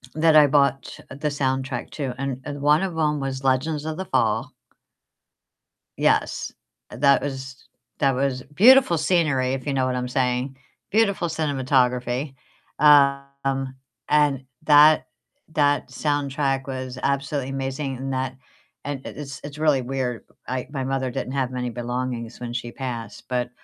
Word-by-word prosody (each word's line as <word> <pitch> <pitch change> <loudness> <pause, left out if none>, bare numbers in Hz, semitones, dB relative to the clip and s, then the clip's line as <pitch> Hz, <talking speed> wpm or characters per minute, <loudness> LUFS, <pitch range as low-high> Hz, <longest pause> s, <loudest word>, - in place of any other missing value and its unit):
that 160 0 +4
I 150 -1 +8
bought 140 -1 +1
the 150 +3 -3
soundtrack 130 -2 -2
to, 135 -5 -3
and 135 -1 -3
and 145 -1 -6
one 150 +3 +4
of 175 -4 -3
'em 150 -2 +1
was 135 0 -4
Legends 145 +3 +1
of 160 0 -4
the 190 - -4
Fall. - - 0 1.5
Yes, - - +1 0.4
that 140 +1 +3
was 135 -1 -6 0.4
that 135 -3 +3
was 130 -1 -1
beautiful 240 - +6
scenery, 150 -6 +1
if 135 +1 -4
you 140 - -1
know 130 -1 +1
what 130 0 -1
I'm 125 0 -2
saying, 130 0 -1 0.3
beautiful 200 -5 +2
cinematography. 130 -3 0 0.4
Um, 140 -2 +3 0.3
and 145 -3 +2 0.2
that 150 -3 +6 0.5
that 145 -1 +2
soundtrack 140 -2 -1
was 130 -1 -5
absolutely 140 -1 -1
amazing 135 0 -3
in 135 +1 -5
that 130 0 -2 0.5
And 140 -2 -5
it - - -8
it's 140 -2 -7
it's 145 0 -8
really 150 -4 +2
weird. 125 -2 -3 0.2
I 130 0 -3
my 135 -3 -3
mother 135 -1 -1
didn't 130 - -4
have 130 -2 -1
many 125 -1 -3
belongings 120 0 -4
when 120 -1 -5
she 120 -1 -4
passed, 120 -5 -6
but 125 -1 -1
135 Hz, 145 wpm, -23 LUFS, 130-145 Hz, 1.5 s, I